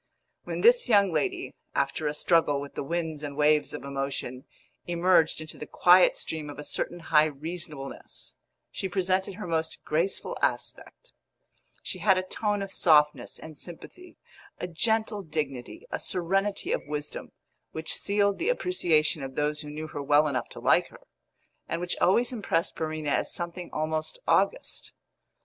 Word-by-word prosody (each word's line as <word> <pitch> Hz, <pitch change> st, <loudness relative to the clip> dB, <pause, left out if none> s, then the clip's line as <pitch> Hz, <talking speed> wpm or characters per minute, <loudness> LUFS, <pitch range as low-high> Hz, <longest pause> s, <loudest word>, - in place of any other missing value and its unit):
When -, -, -3 dB
this 480 Hz, -, +5 dB
young 200 Hz, -4 st, +5 dB
lady, 155 Hz, -, -1 dB, 0.2 s
after 140 Hz, +2 st, 0 dB
a 150 Hz, -, -1 dB
struggle 155 Hz, -3 st, +3 dB
with 140 Hz, 0 st, -7 dB
the -, -, -4 dB
winds 160 Hz, 0 st, -2 dB
and 145 Hz, -1 st, -6 dB
waves 150 Hz, -1 st, +3 dB
of -, -, -6 dB
emotion, 135 Hz, -2 st, -4 dB, 0.4 s
emerged 175 Hz, -2 st, +3 dB
into 155 Hz, -, -8 dB
the 150 Hz, -, -6 dB
quiet 180 Hz, +1 st, +6 dB
stream 155 Hz, -2 st, -4 dB
of 145 Hz, -, -8 dB
a 150 Hz, -, -6 dB
certain 175 Hz, +3 st, -3 dB
high 150 Hz, 0 st, +7 dB
reasonableness, 155 Hz, -1 st, -6 dB, 0.4 s
she 190 Hz, -, -3 dB
presented 190 Hz, +1 st, 0 dB
her 210 Hz, -, -6 dB
most 160 Hz, -2 st, -1 dB
graceful 165 Hz, +5 st, -1 dB
aspect; -, -, -3 dB, 0.7 s
she -, -, -3 dB
had 190 Hz, -3 st, +4 dB
a 185 Hz, -, 0 dB
tone 205 Hz, +2 st, -1 dB
of 195 Hz, -, -7 dB
softness 150 Hz, -3 st, +3 dB
and 155 Hz, -3 st, -10 dB
sympathy, 350 Hz, -, -10 dB, 0.4 s
a -, -, -4 dB
gentle 215 Hz, +4 st, 0 dB
dignity, 150 Hz, -7 st, -4 dB
a -, -, -2 dB
serenity 195 Hz, +3 st, 0 dB
of -, -, +1 dB
wisdom, 150 Hz, 0 st, -5 dB, 0.4 s
which 160 Hz, 0 st, 0 dB
sealed 200 Hz, 0 st, +1 dB
the -, -, 0 dB
appreciation 170 Hz, -, +2 dB
of 135 Hz, -1 st, -6 dB
those 150 Hz, 0 st, 0 dB
who 150 Hz, -, -8 dB
knew 155 Hz, +1 st, -5 dB
her 150 Hz, -2 st, -6 dB
well 145 Hz, +2 st, +4 dB
enough 140 Hz, -3 st, -2 dB
to -, -, -9 dB
like -, -, +3 dB
her, -, -, -16 dB, 0.7 s
and 165 Hz, -, -1 dB
which 175 Hz, 0 st, -1 dB
always 235 Hz, +7 st, +3 dB
impressed 185 Hz, -7 st, -1 dB
Verena 155 Hz, -2 st, -2 dB
as -, -, +1 dB
something 175 Hz, 0 st, -4 dB
almost 155 Hz, -, -2 dB
august. -, -, +1 dB
160 Hz, 160 wpm, -28 LUFS, 150-185 Hz, 0.7 s, high